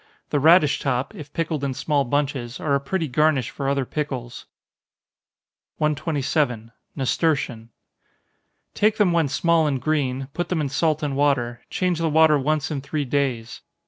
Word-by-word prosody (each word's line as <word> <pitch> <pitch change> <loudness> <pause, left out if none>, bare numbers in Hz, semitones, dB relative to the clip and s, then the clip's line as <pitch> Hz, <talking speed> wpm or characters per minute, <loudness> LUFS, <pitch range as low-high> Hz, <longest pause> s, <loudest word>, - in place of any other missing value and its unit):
The 145 - +2
radish 155 0 +5
top, 130 -1 -1
if 150 -1 -10
pickled 155 -3 -2
in 135 -2 -2
small 145 +1 0
bunches, 135 -2 -2
are 145 - -1
a 140 - +3
pretty 160 +4 -2
garnish 145 -2 +1
for 135 -1 -3
other 140 -1 0
pickles. 130 -5 -5 1.3
127. 145 -6 -1 0.3
Nasturtion. 130 -5 -1 1.0
Take 215 +1 +2
them 205 -4 +3
when 165 -3 +2
small 165 +3 +2
and 135 -3 -1
green 135 -3 -1
put 175 - -3
them 180 - 0
in 145 -3 -1
salt 155 +2 0
and 145 -2 -1
water 130 -4 +1
change 180 -3 -1
the 165 -1 +1
water 155 -1 +5
once 150 +2 -1
in 140 -3 -2
three 145 +1 -3
days. 130 -4 -2
145 Hz, 155 wpm, -23 LUFS, 135-155 Hz, 1.3 s, radish